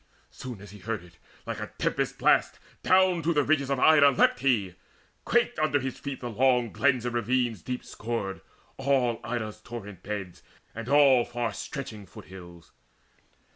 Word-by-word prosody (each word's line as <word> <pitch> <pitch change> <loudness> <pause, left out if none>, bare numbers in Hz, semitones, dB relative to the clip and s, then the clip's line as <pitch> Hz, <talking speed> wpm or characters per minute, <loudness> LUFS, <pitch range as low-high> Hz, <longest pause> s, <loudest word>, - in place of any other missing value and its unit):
Soon 125 -6 -8
as 100 -2 -12
he 105 - -12
heard 110 -2 -4
it, 90 0 -19 0.3
like - - -4
a - - -4
tempest - - -1
blast - - +3 0.2
Down 185 -2 +4
to 165 +1 0
the 145 - +3
ridges 140 -2 +1
of 135 -2 0
Ida 150 -1 +7
leapt 130 - +3
he: 110 -9 +1 0.5
quaked 240 0 +1
Under 155 -2 +2
his 130 -1 -5
feet 140 -2 -6
the 120 - -4
long 125 0 +2
glens 130 -4 +2
and 120 - -2
ravines 120 -3 0
Deep 125 +8 -5
scored, 105 -4 -4 0.4
all 130 -4 +1
Ida's 110 -3 -4
torrent 105 -6 -9
beds, 95 -4 -6 0.3
and 115 +2 -7
all 140 -4 +6
Far 120 -1 -3
stretching 110 -8 -7
foot - - -13
hills. 85 -3 -13
120 Hz, 170 wpm, -27 LUFS, 105-140 Hz, 0.5 s, Ida